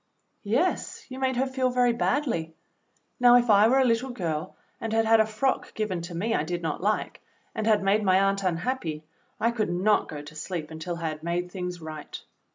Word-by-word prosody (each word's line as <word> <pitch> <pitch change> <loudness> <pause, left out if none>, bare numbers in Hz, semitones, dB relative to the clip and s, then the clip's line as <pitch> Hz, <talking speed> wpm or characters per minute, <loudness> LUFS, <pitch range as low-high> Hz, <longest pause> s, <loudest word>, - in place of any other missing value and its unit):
"Yes, 270 - 0
you 260 0 -7
made 260 -1 0
her 260 +2 +1
feel 260 -1 0
very 245 -1 +3
badly. 230 - -1 0.6
Now, 245 -1 +7
if 240 -2 +4
I 205 +1 +6
were 260 +3 +4
a 265 - +4
little 240 +2 +1
girl 165 -10 -3 0.2
and 225 - -4
had 225 0 +3
had 225 0 +5
a 220 - +4
frock 255 +5 -1
given 205 -5 -2
to 170 +1 -7
me 215 +7 -1
I - - +1
did 175 -1 -4
not 160 0 -2
like, 210 +3 -1 0.3
and 220 - -2
had 210 -2 +3
made 200 +2 +3
my 190 -1 +4
aunt 195 0 +2
unhappy, 170 -3 -2 0.4
I 230 - +2
could 220 -4 -1
not 190 +5 +2
go 145 -1 -6
to 145 - -11
sleep 155 -1 -5
until 165 +2 -5
I 165 -1 -2
had 155 0 -7
made 175 +2 -2
things 180 -2 -5
right. 155 -1 -7
205 Hz, 210 wpm, -26 LUFS, 170-240 Hz, 0.6 s, Now